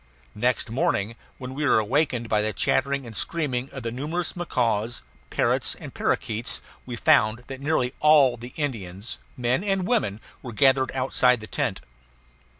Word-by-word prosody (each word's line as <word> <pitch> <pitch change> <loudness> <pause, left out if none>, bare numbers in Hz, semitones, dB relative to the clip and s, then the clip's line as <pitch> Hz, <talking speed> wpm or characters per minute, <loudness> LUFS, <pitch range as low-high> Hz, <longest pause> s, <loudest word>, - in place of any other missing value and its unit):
Next 120 0 0
morning, 115 -6 0 0.2
when 130 0 -7
we 150 +3 -3
were 145 - +4
awakened 120 +2 +1
by 105 -1 +2
the 110 0 -1
chattering 140 0 +1
and 115 -2 -9
screaming 135 -5 -1
of 135 -3 -7
the 115 - -2
numerous 155 +8 -3
macaws, 120 - -1 0.3
parrots, - - +1
and - - -10
parakeets, 110 +2 -1 0.3
we 120 - -4
found 110 0 +3
that 135 0 -8
nearly 140 -4 +1
all 145 -5 +6
the 120 +1 -10
Indians, 105 - -4 0.2
men 125 +7 +1
and 195 -2 0
women, 205 - +1 0.2
were 120 -3 -7
gathered 130 +2 +4
outside 130 -1 +3
the 110 - -8
tent. - - -2
125 Hz, 155 wpm, -25 LUFS, 115-145 Hz, 0.3 s, all